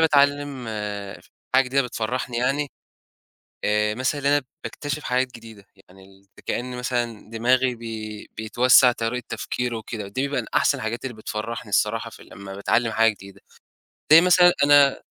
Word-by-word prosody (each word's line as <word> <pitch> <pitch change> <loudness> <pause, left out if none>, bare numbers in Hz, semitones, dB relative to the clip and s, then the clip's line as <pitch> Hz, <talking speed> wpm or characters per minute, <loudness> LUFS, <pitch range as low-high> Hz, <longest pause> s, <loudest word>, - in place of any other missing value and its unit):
باتعلّم 145 -3 +2
آآ، 105 -2 -5 0.3
حاجة 135 +1 +6
جديدة 135 +2 +1
بتفرحني 125 +1 -3
يعني، 135 +4 0 1.0
آآ 105 0 +1
مثلًا 130 +4 -1
إن 140 - -4
أنا 145 0 +3 0.2
باكتشف 145 0 -5
حاجات 125 0 -1
جديدة 115 -3 -13 0.2
يعني 95 +1 -17
ال 95 0 -21
في - - -16
كأن 125 +1 -3
مثلًا 120 -3 -3
دماغي 125 +3 +2
بي 110 -2 -7
بيتوسّع 125 +3 +5
طريقة 120 +1 -3
تفكيره 125 -1 -3
وكده، 110 -2 -6
دي 130 +8 -2
من 140 - -2
أحسن - - +3
الحاجات 110 +3 -4
اللي 130 -2 -5
بتفرّحني 110 +1 -5
الصراحة 115 +3 0
في - - -14
لمّا 95 0 -10
باتعلّم 115 +3 0
حاجة 115 0 +4
جديدة، 100 -1 -14 0.7
زي 165 - +10
مثلًا 180 0 +6
أنا 145 -1 +5
120 Hz, 155 wpm, -23 LUFS, 110-135 Hz, 1.0 s, زي